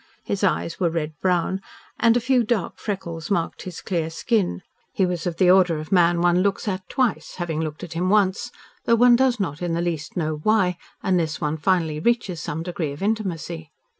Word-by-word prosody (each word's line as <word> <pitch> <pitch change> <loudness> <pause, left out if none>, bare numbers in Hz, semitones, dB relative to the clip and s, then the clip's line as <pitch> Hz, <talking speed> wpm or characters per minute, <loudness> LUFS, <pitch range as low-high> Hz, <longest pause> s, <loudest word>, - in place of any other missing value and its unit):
His 200 0 -3
eyes 170 -3 0
were 175 -3 +2
red 160 -2 -3
brown, 185 +1 +1 0.4
and 230 0 +5
a - - +3
few 255 0 +2
dark 215 -5 -1
freckles 170 -5 -5
marked 170 -5 -1
his 180 -2 -7
clear 165 -4 -1
skin. 170 - 0 0.3
He 190 - +1
was 180 -1 -2
of 170 -2 -3
the 180 -2 +5
order 180 -3 +4
of 155 0 -7
man 175 -2 +4
one 175 +1 +3
looks 200 +2 0
at 190 -2 -3
twice, 255 -4 -1
having 165 -3 -2
looked 155 -1 -5
at 175 -2 -7
him 180 +2 0
once, 200 -1 +2 0.4
though 230 - +4
one 245 +1 +6
does 255 -1 +2
not 165 -6 -3
in 175 -1 -1
the - - -1
least 165 -2 -3
know 155 -2 -1
why, 185 0 +2 0.3
unless 170 -5 0
one 150 -1 -1
finally 160 -3 +1
reaches 195 -4 0
some 155 +2 -4
degree 170 -4 -3
of 145 - -8
intimacy. 175 -7 -2
180 Hz, 200 wpm, -23 LUFS, 165-200 Hz, 0.4 s, one